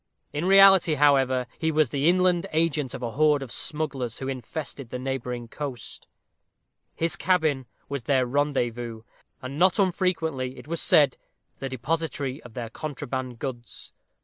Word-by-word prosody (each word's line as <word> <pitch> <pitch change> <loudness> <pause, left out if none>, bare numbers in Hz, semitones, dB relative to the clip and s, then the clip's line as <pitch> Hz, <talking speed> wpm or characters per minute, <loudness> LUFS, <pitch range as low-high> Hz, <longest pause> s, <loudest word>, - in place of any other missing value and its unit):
In 150 +4 -2
reality, 195 -4 +7
however, 135 -3 +3
he 160 0 +1
was 155 -5 +2
the 140 +3 +2
inland 180 0 +3
agent 155 -5 0
of 125 - -7
a 115 - -2
horde 150 +1 +3
of 125 - -9
smugglers 140 -7 -3
who 130 - -5
infested 135 0 -5
the 125 - -4
neighboring 125 -2 -4
coast; 130 -2 -7 0.9
his 165 0 0
cabin 155 -8 +1 0.2
was 140 -4 -5
their 130 -2 +2
rendezvous; 120 -4 -1 0.4
and 135 +3 -5
not 185 0 +4
unfrequently, 165 -9 0
it - - -12
was 165 +1 -1
said, 145 -4 +4 0.4
the 135 - -4
depository 140 +1 -3
of 120 -2 -14
their 115 -2 -5
contraband 130 -4 -5
goods. 120 -2 -7
140 Hz, 150 wpm, -26 LUFS, 125-160 Hz, 0.9 s, reality